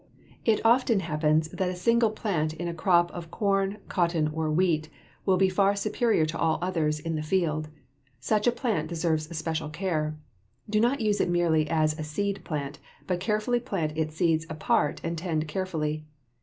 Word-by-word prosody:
It 225 -1 +2
often 230 -3 +4
happens 155 -1 +1
that 185 +1 -1
a 180 - -3
single 230 +5 +3
plant 170 -8 -1
in 175 - -4
a 170 - -3
crop 175 +1 +3
of 170 -2 -8
corn, 195 +1 0
cotton, 170 -4 +1
or 160 0 -1
wheat 155 -1 +1 0.4
will 190 -1 +4
be 190 +1 +4
far 195 +2 +2
superior 215 -3 +1
to 155 +1 -4
all 160 -1 +2
others 160 -4 0
in 165 +2 -3
the 155 - -2
field. 155 -2 0 0.5
Such 210 - +1
a - - +6
plant 220 - -1
deserves 160 -1 -1
special 160 -1 -2
care. 155 -2 -2 0.5
Do 215 0 +1
not 245 +4 +2
use 210 -2 +2
it - - +1
merely 165 -3 +2
as 155 -1 +1
a - - -2
seed 200 +7 -2
plant, 140 -2 -4 0.3
but 180 -1 -1
carefully 215 +5 0
plant 175 -11 -3
its 155 -1 -2
seeds 165 -1 +1
apart 155 -2 +1
and 165 -1 -2
tend 160 -3 -1
carefully. 155 -3 -3
170 Hz, 180 wpm, -27 LUFS, 155-195 Hz, 0.5 s, a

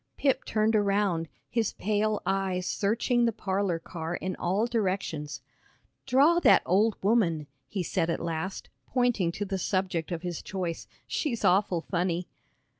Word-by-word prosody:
Pip 275 -2 +1
turned 220 +1 +2
around, 200 -5 +1 0.2
his 230 -3 0
pale 210 +1 0
eyes 190 -2 0
searching 235 +5 +1
the 230 - +2
parlor 195 -4 -1
car 165 0 -5
in 185 +1 -3
all 195 +6 +1
directions. 185 - -2 0.7
"Draw 285 +7 +5
that - - +6
old 210 +4 +3
woman," 185 -8 +2 0.2
he 185 +5 -3
said 170 0 0
at 165 - 0
last, 170 +3 -4 0.2
pointing 245 -9 +1
to 205 - -3
the 195 -1 -3
subject 185 -4 -1
of 170 0 -3
his 175 -2 -4
choice; 180 -4 -4 0.2
"she's 250 -8 -2
awful 185 -2 +3
funny." 175 0 -1
195 Hz, 145 wpm, -28 LUFS, 175-215 Hz, 0.7 s, that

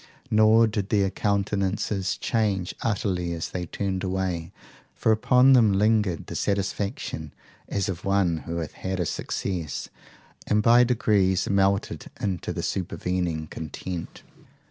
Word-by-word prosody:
Nor 110 +1 +6
did 105 -2 -2
their 100 -3 +2
countenances 100 -1 -1
change 100 -6 0
utterly 90 -5 -1
as 85 +1 -4
they 90 -1 -4
turned 95 +2 -3
away, 90 -3 -2 0.4
for 110 - +2
upon 125 +4 +5
them 115 -6 +5
lingered 105 -3 +2
the - - -7
satisfaction 100 - -2 0.4
as 100 -2 -1
of 90 -3 -4
one 95 -4 +2
who 85 +2 -6
hath 80 -2 -4
had 95 0 -4
a 90 - +1
success, 80 -1 -3 0.6
and 105 0 +2
by 120 +2 +7
degrees 105 -6 +2
melted 100 0 +1
into 95 -4 -2
the - - -4
supervening 90 -2 -2
content. 80 +3 -7
95 Hz, 130 wpm, -25 LUFS, 90-105 Hz, 0.6 s, by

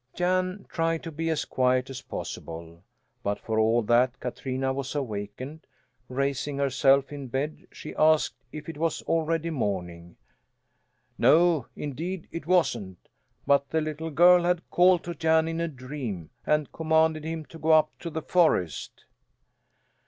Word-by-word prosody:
Jan 185 +2 0
tried 165 -1 -1
to 165 - -6
be 165 +2 -2
as 160 -2 0
quiet 130 0 +1
as 135 0 -6
possible, 85 -5 -7 0.4
but 100 0 -1
for 110 -1 -1
all 115 +2 +3
that 120 +3 +2
Katrina 130 +1 -2
was 135 +1 -4
awakened; 130 +4 -5 0.4
raising 140 +2 -1
herself 135 0 +3
in 140 -2 -6
bed 135 +5 -3
she - - -9
asked 155 0 +3 0.2
if 155 - -8
it 160 -2 -7
was 165 0 -1
already 165 0 0
morning. 90 - -3 1.0
No, 165 -5 +4
indeed 165 +6 -5
it 165 -2 -6
wasn't, 120 - 0 0.4
but 140 0 +3
the 160 - +1
little 155 +1 -4
girl 175 +3 +6
had 175 0 0
called 180 -1 +5
to 170 - -4
Jan 160 -1 +2
in 165 0 -2
a 170 - 0
dream, 130 - -6 0.2
and 150 -2 +1
commanded 160 -1 +2
him 160 0 -4
to 165 - -13
go 160 - -2
up 155 -1 +5
to 170 - -5
the 160 -1 -5
forest. 160 - +1
150 Hz, 150 wpm, -27 LUFS, 130-165 Hz, 1.0 s, girl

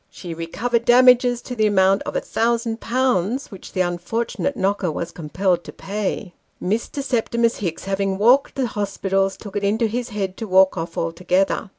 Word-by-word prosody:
She 175 -3 -8
recovered 225 +9 -2
damages 245 0 +5
to 250 - -6
the 215 -2 +3
amount 195 -1 +3
of - - -4
1,OOOZ. 235 0 0
which 195 - -11
the 185 - +1
unfortunate 185 +10 -2
knocker 195 -2 0
was 170 +2 -4
compelled 175 +3 -1
to - - -8
pay. 200 -1 -4 0.3
Mr. 230 +8 -2
Septimus 235 -2 0
Hicks 170 -5 -4
having 195 0 -1
walked 245 +7 +4
the 270 - 0
hospitals, 195 -3 -1
took 205 -2 -10
it 205 - -1
into 215 +4 +2
his 240 +3 -2
head 195 -3 -3
to 225 - -5
walk 190 0 +5
off 165 -1 -5
altogether. 180 +4 0
205 Hz, 165 wpm, -21 LUFS, 185-235 Hz, 0.3 s, damages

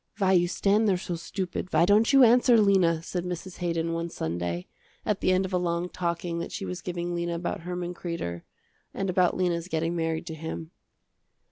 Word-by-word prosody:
"Why 190 -2 +2
you 175 -2 +4
stand 205 +4 +2
there 185 - +3
so 175 -1 -4
stupid, 185 +2 -4
why - - +4
don't 210 +5 +4
you 270 -2 +7
answer, 245 0 +6
Lena," 185 -6 +3
said 180 0 -3
Mrs. 180 +1 -6
Haydon 165 -1 -1
one 165 0 -2
Sunday, 85 - -3 0.4
at 210 -2 0
the - - +3
end 185 +1 +2
of 190 - -6
a 180 - +2
long 175 0 -1
talking 170 -1 -2
that - - -5
she 195 - -4
was 180 -1 -5
giving 175 -1 -3
Lena 170 0 -2
about 170 +1 -3
Herman 180 +1 -4
Kreder, 170 - -4 0.5
and 195 -1 -1
about 180 -1 +2
Lena's 175 -2 0
getting 165 0 -1
married 165 0 -1
to 165 - -6
him. 160 +1 -6
175 Hz, 200 wpm, -27 LUFS, 170-185 Hz, 0.5 s, you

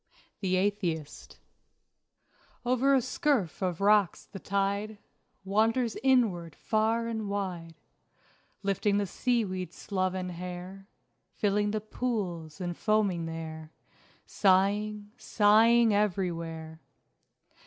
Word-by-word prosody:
THE 185 -2 0
ATHEIST 185 -6 -2 1.3
Over 255 +3 +3
a 265 - +3
scurf 255 - 0
of 180 -1 -2
rocks 205 -3 +3
the 195 - -10
tide 200 +2 -1 0.5
Wanders 225 +4 +1
inward 210 - +2
far 225 +1 0
and 220 -3 -3
wide, 180 -5 -4 0.9
Lifting 200 +1 +1
the 205 - +1
sea 240 +3 0
weed's 185 -1 -5
sloven 185 -2 -2
hair, 180 +2 -7 0.5
Filling 205 0 +1
the 215 0 -2
pools 195 -9 -4
and 175 -2 -3
foaming 200 -6 +1
there, 160 -1 -7 0.6
Sighing, 205 +2 +1
sighing 225 +1 +4
everywhere. 170 -5 -2
200 Hz, 100 wpm, -29 LUFS, 180-215 Hz, 1.3 s, sighing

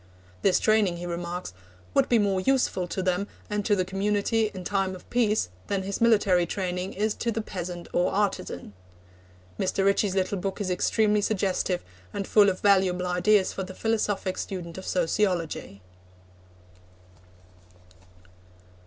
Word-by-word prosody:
This 195 - +3
training, 210 -5 +2
he 175 - -6
remarks, 175 - -4 0.4
'would - - +3
be 240 - +5
more 200 -3 +1
useful 250 -7 +1
to 185 +2 -3
them 185 +2 0 0.2
and 210 0 0
to 205 - +4
the 185 -2 0
community 205 +3 0
in 185 -2 -7
time 190 0 -1
of 180 - -14
peace 220 - +2 0.2
than 195 -1 -1
his 200 +3 -4
military 200 -6 +4
training 180 0 -3
is 215 +2 0
to 235 - -2
the 225 - -2
peasant 180 -4 -5
or 175 - +2
artisan.' 190 - -2 0.9
Mr. 195 +1 0
Ritchie's 200 -1 +2
little 190 +1 0
book 195 +2 -3
is 195 -3 -1
extremely 210 +3 +2
suggestive, 190 -3 0 0.3
and 200 - -3
full 205 -2 +6
of 185 - -3
valuable 190 -3 +3
ideas 185 +3 +3
for - - -4
the 185 0 -7
philosophic 210 -4 -1
student 175 -2 -5
of 190 - -9
sociology. 170 - -1
190 Hz, 145 wpm, -26 LUFS, 180-210 Hz, 0.9 s, full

